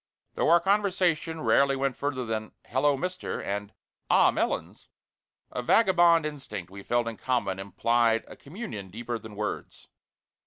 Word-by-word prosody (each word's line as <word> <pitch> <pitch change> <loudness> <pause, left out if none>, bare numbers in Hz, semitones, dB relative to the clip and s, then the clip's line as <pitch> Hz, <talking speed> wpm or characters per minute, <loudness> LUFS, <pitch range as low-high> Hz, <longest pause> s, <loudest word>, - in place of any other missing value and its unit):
Though - - +1
our 170 +1 +7
conversation 180 -5 +1
rarely 140 -2 +3
went 135 -1 -1
further 135 -3 -2
than 110 -1 -4
"Hello, 140 +2 +2
Mister!" 180 +5 -4
and 100 +1 -4 0.4
"Ah, - - +5
Melons!" - - -3 0.6
a 125 - -3
vagabond 175 - +4
instinct 105 - -6
we 100 0 -9
felt 120 +3 0
in 115 -2 -5
common 120 -7 -1
implied 115 +3 +1
a - - -11
communion 140 - -8
deeper 120 +4 -5
than 110 -1 -11
words. 105 0 -5
130 Hz, 145 wpm, -27 LUFS, 110-165 Hz, 0.6 s, our